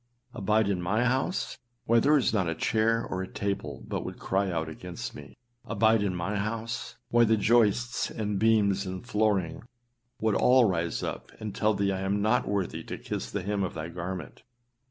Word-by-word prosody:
Abide 110 -1 +2
in 95 -3 0
my 105 +7 +1
house! 130 +8 -1 0.3
why 115 0 +5
there 150 +5 +5
is 130 - +1
not 95 -6 +1
a 85 - -2
chair 115 +1 +1
or 95 - -3
a 95 - -4
table 100 -1 -3
but - - -3
would - - -6
cry 95 +1 0
out 80 -2 -1
against 85 +2 -7
me. 70 -3 -11 0.3
Abide 110 0 +3
in 100 -3 0
my 95 +4 -2
house! 115 +3 -3
why 120 0 +5
the 110 -1 +4
joists 120 +2 +2
and 105 -3 -2
beams 100 -3 +3
and 95 +4 -6
flooring 105 -6 0 0.6
would 110 -1 +1
all 125 +3 +5
rise 85 -4 -1
up - - -5
and 105 -2 -5
tell 110 -1 +2
thee 100 0 +1
that 95 - 0
1 95 - -4
am 100 +1 0
not 110 +2 +2
worthy 100 -3 -1
to - - -6
kiss - - -4
the 100 - -3
hem 100 0 -1
of 95 - -3
thy 80 +1 -4
garment. 90 +1 -6
105 Hz, 195 wpm, -28 LUFS, 95-115 Hz, 0.6 s, why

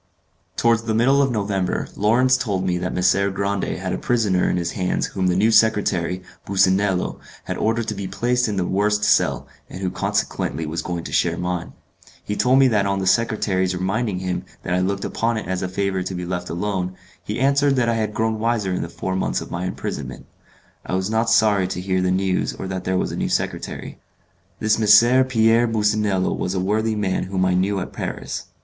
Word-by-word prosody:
Towards 115 -1 +3
the 110 -1 0
middle 135 +5 +4
of 135 - +2
November, 100 -4 -1
Lawrence 125 +5 +3
told 100 -8 -1
me 90 -1 0
that 90 +1 -2
Messer 95 +2 +2
Grande 100 0 -2
had 95 0 -3
a - - -3
prisoner 105 -7 +1
in - - 0
his 85 -1 -2
hands 90 -2 -1
whom 95 -1 -2
the 90 - +2
new 105 +4 +3
secretary, 95 -5 +2 0.2
Businello, 95 -1 +1 0.2
had - - -4
ordered 115 +1 0
to - - -2
be 100 -1 -5
placed 125 +3 0
in 105 - -2
the 90 - 0
worst 105 +3 +1
cell, - - +2 0.2
and - - -8
who 95 -2 -2
consequently 80 -2 -2
was 80 +2 -3
going 85 -2 -4
to - - -7
share - - +1
mine. 90 -1 -3 0.5
He 105 - -3
told 125 +4 +3
me 135 -1 +6
that 105 -4 +2
on 100 0 0
the 95 - -2
secretary's 95 -4 +1
reminding 95 +3 -1
him 90 0 -3 0.2
that 90 - -2
I 90 - +2
looked 100 +2 -1
upon 115 0 -1
it 105 - -5
as 95 0 -2
a 90 - -1
favour 95 0 -1
to 95 +1 -4
be 90 0 -4
left 90 0 -4
alone, 90 0 -2 0.3
he 105 - -4
answered 140 +1 +3
that 125 -2 +1
I 115 - +2
had 110 -2 -2
grown 110 0 0
wiser 110 -4 0
in 90 - -2
the - - -4
four 85 +2 -4
months 95 - 0
of - - -9
my 85 +1 -3
imprisonment. 70 -7 -5 0.6
I - - -3
was 95 +3 -1
not 110 +1 +1
sorry 105 -4 +3
to 90 - -4
hear 95 0 0
the 90 - +1
news 95 0 0
or 95 - -6
that 95 -1 -4
there 95 0 0
was - - -1
a - - -4
new - - -2
secretary. - - -3 0.6
This 110 0 +1
M. 120 +5 +6
Pierre 115 -1 +3
Businello 105 -3 +1
was 90 +1 -2
a - - 0
worthy 110 +4 0
man 100 -3 -1
whom 95 0 0
I 95 - +2
knew 95 +2 +1
at 90 - -6
Paris. - - -5
100 Hz, 215 wpm, -22 LUFS, 90-110 Hz, 0.6 s, me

